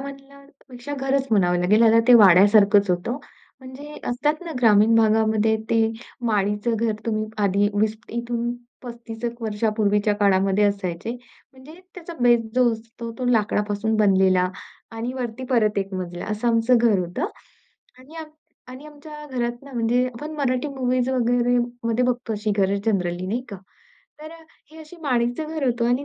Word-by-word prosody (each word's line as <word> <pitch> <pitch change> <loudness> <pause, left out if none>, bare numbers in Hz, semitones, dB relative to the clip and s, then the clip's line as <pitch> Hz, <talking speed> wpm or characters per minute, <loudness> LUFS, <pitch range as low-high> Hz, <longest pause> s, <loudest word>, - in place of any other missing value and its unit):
म्हणण्यापेक्षा 275 -1 -10
घरच 270 0 -1
म्हणावं 180 -5 +2
लागेल. 200 +6 +3
ह्याला 230 0 +5
ते 250 - +9
वाड्यासारखंच 205 0 +6
होतं. 180 +9 -2 0.4
म्हणजे 265 +3 -11
असतात 295 +5 -1
ना 335 - -6
ग्रामीण 220 -1 +5
भागामध्ये 220 0 +2
ते 225 - +3 0.5
माडीचं 210 +2 0
घर 225 0 0
तुम्ही 215 -1 -1 0.2
आधी 200 +1 +2
20 215 +1 0
एक 235 +1 -5 0.5
35 235 -2 -9
एक 235 0 -4
वर्षापूर्वीच्या 210 -1 0
काळामध्ये 195 0 +2
असायचे. 200 0 -2 0.4
म्हणजे 265 +4 -14 0.2
त्याचा 345 -1 -9
बेस 240 -1 +4
जो 250 -1 +4
असतो 230 +1 -8
तो 255 - -3
लाकडापासून 210 -1 0
बनलेला 190 -3 +3 0.4
आणि 225 +2 -5
वरती 255 -1 -5
परत 215 -4 +2
1 195 -1 -4
मजला 175 -1 -5
असं 215 +3 -1
आमचं 230 +2 +3
घर 230 -4 +3
होतं. 175 -1 -3 0.7
आणि 275 +6 -15
आम 320 -1 -7 0.4
आणि 255 +4 -11
आमच्या 300 0 -11
घरात 240 -2 -4
ना, 280 - -13
म्हणजे 240 +2 +1
आपण 255 +5 -7
मराठी 260 -1 -1
मूव्हीज 255 -2 -1
वगैरे 245 -1 +1 0.3
मध्ये 230 +2 +1
बघतो 245 -2 -2
अशी 210 0 -2
घरं 195 0 +1
जनरली 180 -4 -1
नाही 225 +6 -2
का. 200 - -7 0.6
तर 310 +1 -9
अ, - - -12 0.3
हे 320 - -14
अशी 315 +3 -13
माडीचं 245 +2 -1
घर 315 -2 -3
होतं 240 -2 0
आणि 250 +4 0
230 Hz, 155 wpm, -22 LUFS, 210-255 Hz, 0.7 s, ते